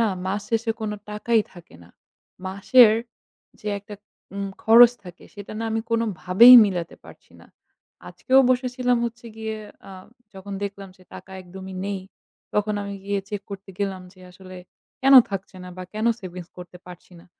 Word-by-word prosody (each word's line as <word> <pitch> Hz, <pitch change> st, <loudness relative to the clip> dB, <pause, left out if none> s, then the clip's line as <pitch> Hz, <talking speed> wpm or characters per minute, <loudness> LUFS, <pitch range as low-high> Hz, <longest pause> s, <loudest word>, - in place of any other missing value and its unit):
না 230 Hz, -, +3 dB, 0.2 s
মাস 200 Hz, +2 st, -2 dB
শেষে 225 Hz, 0 st, 0 dB
কোনো 215 Hz, -1 st, -3 dB, 0.2 s
টাকাই 220 Hz, +2 st, +1 dB
থাকে 175 Hz, -, -16 dB
না। 85 Hz, -, -20 dB, 0.6 s
মাসের 210 Hz, +5 st, +5 dB, 0.7 s
যে 210 Hz, -, -6 dB
একটা 205 Hz, +1 st, -12 dB, 0.4 s
উম 200 Hz, 0 st, -4 dB
খরচ 235 Hz, +2 st, +7 dB
থাকে 180 Hz, -1 st, -13 dB
সেটা 205 Hz, 0 st, -10 dB
না 225 Hz, -, -4 dB
আমি 225 Hz, -, -1 dB
কোনোভাবেই 230 Hz, +1 st, +5 dB
মিলাতে 175 Hz, -4 st, -5 dB
পারছি -, -, -17 dB
না। -, -, -18 dB, 0.6 s
আজকেও 260 Hz, +1 st, +1 dB
বসে 255 Hz, 0 st, +1 dB
ছিলাম 250 Hz, -1 st, +1 dB
হচ্ছে 235 Hz, 0 st, -7 dB
গিয়ে 220 Hz, 0 st, -5 dB, 0.3 s
আ -, -, -11 dB, 0.4 s
যখন 195 Hz, +1 st, -10 dB
দেখলাম 200 Hz, -1 st, -7 dB
যে 185 Hz, -, -21 dB
টাকা -, -, -12 dB
একদমই 190 Hz, +1 st, -10 dB
নেই, 200 Hz, -1 st, -4 dB, 0.5 s
তখন 210 Hz, 0 st, 0 dB
আমি 200 Hz, 0 st, -6 dB
গিয়ে 200 Hz, 0 st, -2 dB
চেক 205 Hz, -1 st, -5 dB
করতে 195 Hz, 0 st, -9 dB
গেলাম 195 Hz, -2 st, -3 dB
যে 185 Hz, -, -21 dB
আসলে 185 Hz, 0 st, -13 dB, 0.4 s
কেনো 270 Hz, 0 st, +8 dB
থাকছে 195 Hz, -1 st, -7 dB
না? 180 Hz, -, -10 dB
বা 185 Hz, -, -7 dB
কেনো 220 Hz, +2 st, 0 dB
savings 180 Hz, -2 st, -9 dB
করতে 180 Hz, 0 st, -11 dB
পারছি 180 Hz, +1 st, -14 dB
না? -, -, -22 dB
200 Hz, 170 wpm, -23 LUFS, 190-225 Hz, 0.7 s, কেনো